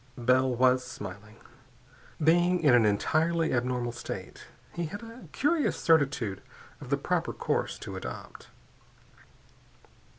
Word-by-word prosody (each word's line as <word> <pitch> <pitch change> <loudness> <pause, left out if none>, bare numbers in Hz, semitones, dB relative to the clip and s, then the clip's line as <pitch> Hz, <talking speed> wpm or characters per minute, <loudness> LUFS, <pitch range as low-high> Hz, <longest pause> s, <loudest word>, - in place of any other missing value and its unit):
Bell 130 +2 +3
was 125 +1 +3
smiling. 100 +1 -9 0.8
Being 175 +3 +3
in 140 -5 +6
an 115 -3 +5
entirely 160 +10 +1
abnormal 125 -1 -1
state, 120 - -8 0.3
he 170 -1 -3
had 205 +8 -8
a 230 +2 -11
curious 300 +2 +1
certitude 135 - +2 0.4
of - - -9
the - - +2
proper - - -1
course - - -2
to - - -8
adopt. 60 - -8
130 Hz, 120 wpm, -28 LUFS, 120-170 Hz, 0.8 s, in